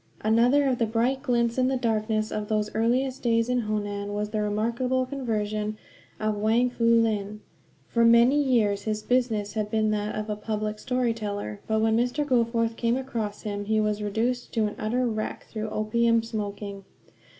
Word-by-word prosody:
Another 240 Hz, +6 st, +4 dB
of 255 Hz, -3 st, +1 dB
the 230 Hz, -, +2 dB
bright 240 Hz, +4 st, 0 dB
glints, 235 Hz, -2 st, +1 dB
in 255 Hz, -, +3 dB
the 265 Hz, 0 st, +1 dB
darkness 215 Hz, -2 st, 0 dB
of 210 Hz, -1 st, -3 dB
those 210 Hz, -1 st, -1 dB
earliest 255 Hz, +4 st, 0 dB
days 230 Hz, 0 st, +1 dB
in 250 Hz, 0 st, +2 dB
Honan, 205 Hz, -1 st, -3 dB
was 210 Hz, 0 st, -2 dB
the 215 Hz, -1 st, -1 dB
remarkable 235 Hz, +5 st, 0 dB
conversion 215 Hz, -5 st, -2 dB, 0.4 s
of 215 Hz, -1 st, -1 dB
Wang 230 Hz, +4 st, +2 dB
Fu 235 Hz, -1 st, -1 dB
Lin. 215 Hz, -3 st, +2 dB, 0.5 s
For 235 Hz, -, +2 dB
many 235 Hz, +5 st, +6 dB
years 220 Hz, -7 st, +2 dB
his 215 Hz, -1 st, -2 dB
business 230 Hz, -5 st, 0 dB
had 215 Hz, -1 st, -2 dB
been 215 Hz, 0 st, +1 dB
that 210 Hz, 0 st, -2 dB
of 215 Hz, 0 st, -3 dB
a 210 Hz, -, -2 dB
public 215 Hz, 0 st, -3 dB
story 250 Hz, -1 st, 0 dB
teller; 205 Hz, -, -5 dB
but 220 Hz, 0 st, +1 dB
when 220 Hz, 0 st, +3 dB
Mr. 245 Hz, +5 st, +1 dB
Goforth 230 Hz, -3 st, +1 dB
came 235 Hz, +1 st, +1 dB
across 230 Hz, -6 st, -4 dB
him 205 Hz, -1 st, -4 dB
he 220 Hz, +1 st, +1 dB
was 210 Hz, 0 st, 0 dB
reduced 230 Hz, +4 st, -1 dB
to 220 Hz, -2 st, +2 dB
an 210 Hz, -, -3 dB
utter 245 Hz, +4 st, 0 dB
wreck 215 Hz, -2 st, -3 dB
through 220 Hz, -1 st, -4 dB
opium 230 Hz, +2 st, +2 dB
smoking. 205 Hz, -3 st, -5 dB
220 Hz, 180 wpm, -26 LUFS, 210-240 Hz, 0.5 s, many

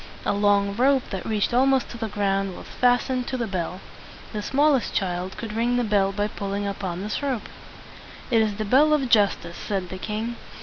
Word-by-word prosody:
A -, -, +2 dB
long 200 Hz, -1 st, +2 dB
rope 265 Hz, +1 st, +3 dB
that 190 Hz, -2 st, -4 dB
reached 215 Hz, 0 st, 0 dB
almost 265 Hz, +1 st, +3 dB
to 235 Hz, -, -7 dB
the 225 Hz, -, -2 dB
ground 195 Hz, -2 st, -1 dB
was -, -, -10 dB
fas 245 Hz, 0 st, +2 dB
tened 255 Hz, -2 st, -2 dB
to 260 Hz, -, -2 dB
the 235 Hz, -, -1 dB
bell. 185 Hz, -2 st, -4 dB, 0.5 s
The 210 Hz, -, -2 dB
smallest 275 Hz, +3 st, +2 dB
child 185 Hz, 0 st, -2 dB
could 225 Hz, -2 st, -5 dB
ring 235 Hz, +2 st, +1 dB
the 245 Hz, -, +2 dB
bell 200 Hz, -3 st, +2 dB
by 205 Hz, +1 st, -1 dB
pulling 200 Hz, -1 st, -4 dB
upon 190 Hz, -2 st, -4 dB
this 210 Hz, +6 st, -3 dB
rope. 265 Hz, -6 st, -2 dB, 0.8 s
"It 225 Hz, -2 st, +5 dB
is 215 Hz, -2 st, 0 dB
the 215 Hz, +1 st, -3 dB
bell 285 Hz, +8 st, +5 dB
of 275 Hz, -4 st, +1 dB
justice," 200 Hz, -6 st, +2 dB
said 195 Hz, -4 st, -3 dB
the 185 Hz, -, -6 dB
king. 220 Hz, +4 st, -3 dB
210 Hz, 205 wpm, -24 LUFS, 195-245 Hz, 0.8 s, It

